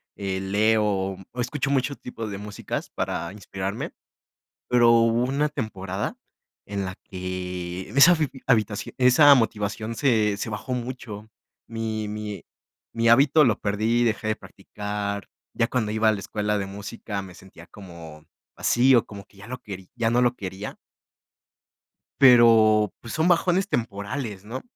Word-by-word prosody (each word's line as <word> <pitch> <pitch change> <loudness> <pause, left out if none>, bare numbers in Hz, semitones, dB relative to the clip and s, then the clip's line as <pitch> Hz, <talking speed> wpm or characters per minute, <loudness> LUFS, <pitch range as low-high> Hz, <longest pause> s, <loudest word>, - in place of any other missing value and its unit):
eh, 95 -1 -3
leo, 100 -1 +1 0.2
escucho 135 +3 -2
mucho 140 +1 0
tipo 115 -4 -7
de 100 -2 -5
músicas 105 0 -6
para - - -3
inspirarme, 100 0 -5 0.8
pero 120 -1 +5
hubo 115 +1 +4
una 140 +4 0
temporada 105 -8 -4 0.5
en 100 -1 -3
la 95 -1 -5
que 90 -1 -6
esa 140 +9 +7
habi 155 -4 +1 0.2
habitación 110 -5 0
esa 130 +3 +7
motivación 110 -2 -1
se 110 -6 +2
se 105 - -4
bajó 110 +5 -5
mucho, 120 -4 -6 0.4
mi 110 -1 -3
mi 105 -1 -6 0.5
mi 115 0 +1
hábito 140 +6 +6
lo 115 -6 +2
perdí, 110 +4 +1
dejé 110 -1 -1
de 110 - 0
practicar, 105 -1 -6 0.3
ya 115 - +1
cuando 110 -5 -1
iba 110 0 +2
a - - +5
la 105 - -3
escuela 105 +1 -2
de 100 - -3
música 100 +1 -6
me 95 -2 -11
sentía 90 -2 -15
como 85 -6 -12 0.3
vacío, 120 -1 +4
como 100 -2 -10
que - - -25
ya 100 - -11
lo 130 +1 -5
querí 95 -3 -9
ya 115 -1 +1
no 120 +1 +3
lo 120 0 +2
quería. 95 -1 -7 1.4
Pero 115 -5 +6
pues 115 - -8
son 160 +2 +1
bajones 180 +2 +2
temporales, 105 - -4
¿no? 125 +5 -6
110 Hz, 150 wpm, -24 LUFS, 100-120 Hz, 1.4 s, esa